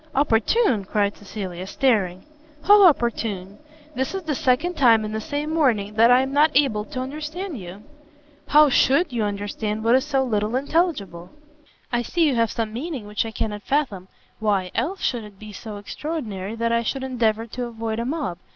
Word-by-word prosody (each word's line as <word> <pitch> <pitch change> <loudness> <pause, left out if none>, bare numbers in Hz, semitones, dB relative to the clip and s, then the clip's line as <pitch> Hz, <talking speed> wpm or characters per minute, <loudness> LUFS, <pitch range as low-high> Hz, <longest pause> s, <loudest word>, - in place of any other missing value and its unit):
"Opportune?" 260 - +2
cried 200 +1 0
Cecilia, 190 -3 -7
staring, 200 -7 0 0.4
"how 410 0 +7
opportune? 215 - -1 0.3
this 265 +7 -2
is 385 - -4
the 315 -2 -2
second 260 +7 +1
time 230 -7 +4
in 215 - -5
the 220 0 -3
same 295 +5 -3
morning 230 -10 +1
that 225 +2 +5
I 250 +1 +6
am 265 +1 -3
not 300 +2 +5
able 245 -7 +2
to 255 - -6
understand 305 - -5
you!" 185 +3 -10 0.6
"How 300 +1 +6
should 275 +3 +3
you 235 - -1
understand 210 +1 -3
what 230 +1 +3
is 260 +1 +4
so 275 -3 0
little 215 -2 -1
intelligible?" 260 - -1 0.6
"I 240 -1 +1
see 330 +8 +1
you 285 - +2
have 230 -2 +2
some 220 -1 -3
meaning 265 -2 -5
which 210 +2 -2
I - - -6
cannot 210 -1 -4
fathom, 215 -9 -1 0.3
why, 200 -4 0
else, 340 +12 -2
should 240 -3 -1
it 210 -2 -13
be 215 +1 -11
so 210 +1 -8
extraordinary 215 - -5
that 230 0 -1
I 235 0 +2
should 265 +4 -3
endeavour 230 -4 0
to 245 +2 -5
avoid 225 -1 -4
a 235 - -2
mob? 270 - -3
230 Hz, 185 wpm, -23 LUFS, 210-280 Hz, 0.6 s, how